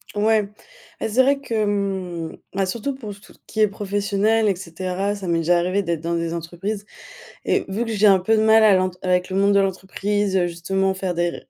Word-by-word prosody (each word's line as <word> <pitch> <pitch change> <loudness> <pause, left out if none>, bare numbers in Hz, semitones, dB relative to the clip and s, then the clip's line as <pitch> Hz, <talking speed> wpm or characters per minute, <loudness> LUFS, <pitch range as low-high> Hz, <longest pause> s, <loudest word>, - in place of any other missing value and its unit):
Ouais, 210 0 +2 0.5
et - - -1
c'est 250 +5 +4
vrai 275 +1 +2
que 270 - -6
hem, 195 -6 -2 0.2
bah, 195 0 0
surtout 235 +8 -3
pour 220 -6 -8
s 200 - -11
tout - - -18
qui 220 - -6
est 215 - +6
professionnel, 205 +2 0
et 195 - +2
cetera, 185 +3 -3
ça 200 -2 -6
m'est 170 -1 +1
déjà 175 +2 +3
arrivé 185 +3 0
d'être 170 -3 -2
dans 170 +1 -2
des 170 0 -2
entreprises 180 +5 -5 0.6
et - - 0
vu 200 +5 -2
que 230 - -4
j'ai 210 -1 +3
un 195 -2 +6
peu 220 +5 +2
de - - +3
mal 220 0 +5
à 210 -2 +6
l'ent 185 0 +2
avec 180 0 +1
le 185 - -4
monde 200 +1 +3
de 200 - +5
l'entreprise, 195 +1 -1
justement 190 +3 -1
faire 190 -2 -3
des 175 0 +1
ré - - -10
195 Hz, 225 wpm, -22 LUFS, 180-210 Hz, 0.6 s, est